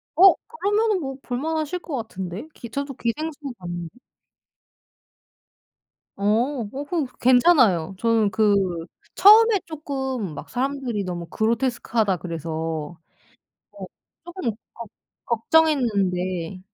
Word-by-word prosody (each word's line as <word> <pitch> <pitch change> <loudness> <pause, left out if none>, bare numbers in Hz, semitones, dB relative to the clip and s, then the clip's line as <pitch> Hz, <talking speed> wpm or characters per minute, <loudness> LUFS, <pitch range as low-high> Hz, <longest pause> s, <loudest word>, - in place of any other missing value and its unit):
어 380 +3 +8
그러면은 425 -2 0
뭐 270 -3 -5
볼만하실 310 +6 -2
것 320 -5 -6
같은데? 205 - -6
기 235 - -10
저도 280 +3 -4
기생수 295 +6 -3 0.2
봤는데. 175 +5 -7 2.2
어 200 - -6 0.5
오 280 +2 -5
그거 320 -1 -1
괜찮아요. 245 - +4
저는 225 -2 +2
그 210 +1 +3 0.6
처음에 430 +1 +7
쪼끔 265 - -4
막 - - -9
사람들이 255 -4 -2
"너무 175 -1 -4
그로테스크하다." 225 -1 0
그래서 160 -1 -4 0.7
어 - - -9 0.4
쪼끔 350 -8 -3 0.2
걱 235 -2 -9 0.4
걱정했는데 200 - +1
240 Hz, 235 characters per minute, -23 LUFS, 190-305 Hz, 2.2 s, 어